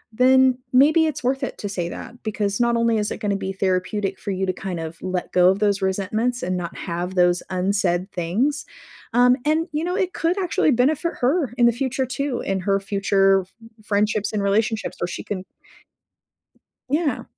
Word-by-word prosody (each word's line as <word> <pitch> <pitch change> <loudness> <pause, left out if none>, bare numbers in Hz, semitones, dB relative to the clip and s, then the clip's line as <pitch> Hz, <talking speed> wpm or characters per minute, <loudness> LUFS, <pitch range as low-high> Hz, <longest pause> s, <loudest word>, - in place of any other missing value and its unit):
then 260 +1 +5 0.2
maybe 310 +5 +5
it's 300 -2 -3
worth 265 +2 0
it - - -4
to 205 - -4
say 175 -3 -3
that, 240 +7 -9
because 205 -2 -2
not 235 0 +2
only 230 -1 +2
is 210 - -1
it - - -3
gonna 205 -1 -1
be 195 -1 -3
therapeutic 190 +1 -1
for - - -6
you 190 0 -1
to 185 - -1
kind 185 -2 -5
of 165 0 -7
let 185 -1 -3
go 180 0 +6
of 190 - +2
those 205 -1 +1
resentments 210 +6 -1
and 185 +1 -1
not 170 -1 -5
have 175 +1 -4
those 175 -1 +3
unsaid 185 0 0
things, 210 - 0 0.5
um, 245 +1 +5
and, 315 +2 +1
you 305 +2 -1
know, 355 +1 -1
it 375 -2 -1
could 340 +4 0
actually 360 -4 +1
benefit 285 +7 +1
her 275 +1 +1
in 240 - +5
the - - +5
future 260 +2 -1
too, 260 0 -3
in 195 0 -1
her 195 +1 +1
future 195 -1 +2
f 185 0 -17 0.3
friendships 210 0 +1
and 205 -2 -1
relationships 220 +2 0
where - - 0
she 180 - -6
can 185 -3 -4 1.5
Yeah. 295 +2 0
210 Hz, 195 wpm, -22 LUFS, 190-260 Hz, 1.5 s, go